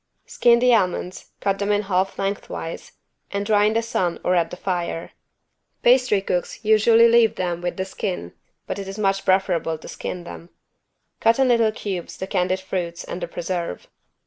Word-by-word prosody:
Skin 235 -1 +4
the 250 +1 +4
almonds, 185 -3 -1
cut 195 -1 0
them 205 0 0
in 205 0 +2
half 190 -1 0
lengthwise 195 -4 -4 0.4
and 200 0 -3
dry 205 -1 +3
in 215 - +2
the 230 - +2
sun 180 -6 -1
or 180 - +2
at 170 -2 +2
the 180 - -8
fire. 175 -3 -3 0.7
Pastry 245 -5 +4
cooks 180 +4 -3
usually 225 +2 +6
leave 230 -1 +4
them 175 -2 -2
with 175 0 -3
the 190 - -2
skin 185 - -4 0.3
but 200 - -4
it 195 - -6
is 195 +1 -7
much 195 -2 +1
preferable 180 -4 +1
to - - -12
skin 180 - -6
them. 170 0 -10 0.7
Cut 225 +1 +4
in 265 -1 +3
little 230 -2 +4
cubes 195 -5 -5
the 190 - -4
candied 185 -1 0
fruits 175 -2 -4
and 175 - -6
the 175 - -3
preserve. 170 - -4
195 Hz, 180 wpm, -22 LUFS, 180-215 Hz, 0.7 s, usually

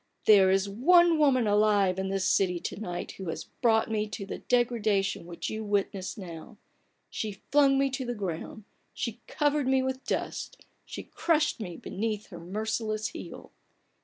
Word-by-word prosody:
"There 195 -3 +7
is 195 +1 +2
one 330 - +5
woman 265 -5 +4
alive 205 -3 +3
in 190 - -1
this 195 -1 0
city 180 -3 +2
to - - -5
night 175 -5 -5
who 190 -3 -7
has - - -4
brought 225 -2 +1
me 215 -1 0
to 205 -1 -6
the - - -6
degradation 220 -7 +1
which 170 -1 -5
you 220 0 -4
witness 200 -2 -2
now. 180 +2 -9 0.5
She 210 -2 -5
flung 280 -2 +5
me 275 0 +2
to 265 0 -3
the 245 - -2
ground, 195 +1 -5 0.3
she 235 0 -4
covered 290 -2 +1
me 265 0 +3
with 260 0 -3
dust, - - -4 0.2
she - - -7
crushed 305 -5 0
me 180 -6 -6
beneath 215 0 -4
her 175 - -9
merciless 215 +4 -2
heel - - -9
215 Hz, 165 wpm, -28 LUFS, 195-255 Hz, 0.5 s, There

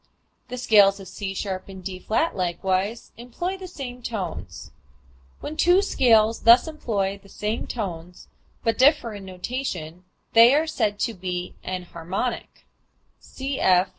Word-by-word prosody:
The 250 0 -6
scales 205 -5 +5
of 195 - -9
C[sharp] 190 0 -5
and 190 -1 -10
D[flat] 195 - -1
likewise 190 +4 -1
employ 250 +11 -4
the 380 -1 -8
same 255 -8 -8
tones. 210 -7 -6 0.7
When 305 - -5
two 355 +4 +4
scales 225 - +3
thus 235 +6 +6
employ 200 -10 -2
the 200 - -18
same 210 +3 -3
tones 180 -6 -6 0.4
but 230 +2 0
differ 260 -4 +4
in 200 -2 -8
notation 180 - -5 0.3
they 235 +4 +8
are 310 +2 +3
said 220 -10 -1
to 230 - 0
be 180 -2 -4
enharmonic, 180 +5 -4 0.6
(cf. 190 -9 +1
210 Hz, 130 wpm, -24 LUFS, 185-250 Hz, 0.7 s, they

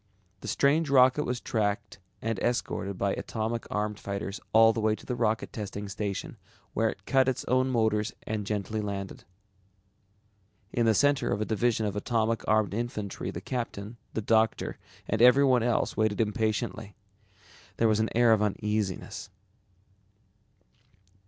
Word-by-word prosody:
The - - -9
strange 150 +2 +2
rocket 130 +2 +5
was 125 0 -2
tracked 105 -3 -2 0.2
and 115 -3 -1
escorted 100 -5 -1
by 100 0 0
atomic 115 +1 -3
armed 105 0 -2
fighters 100 0 -4
all 115 +1 +6
the 115 - -3
way 110 0 +2
to - - -15
the 125 - -2
Rocket 110 -1 -1
Testing 105 -1 -5
Station 100 0 -4 0.4
where - - +2
it - - -9
cut 135 -1 +3
its 130 - -3
own 130 +1 +2
motors 110 -3 +1
and 105 -2 -3
gently 105 +1 -2
landed. 100 -2 -5 1.5
In 120 -1 +2
the 110 - +4
center 145 +1 +2
of 100 - 0
a 110 - 0
division 110 0 +1
of 105 - -2
atomic 115 +1 0
armed 110 -2 +2
infantry 105 -3 -3
the - - -6
captain, 115 -3 -5 0.2
the 110 - -1
doctor, 110 +1 +1 0.3
and 110 +1 0
everyone 125 0 +6
else, 120 0 0
waited 110 -1 +1
impatiently. 110 -1 -1 0.8
There 115 - +3
was 110 -1 +2
an 110 - +1
air 120 -1 +6
of 110 - +2
uneasiness. 105 -2 -2
110 Hz, 150 wpm, -28 LUFS, 105-120 Hz, 1.5 s, all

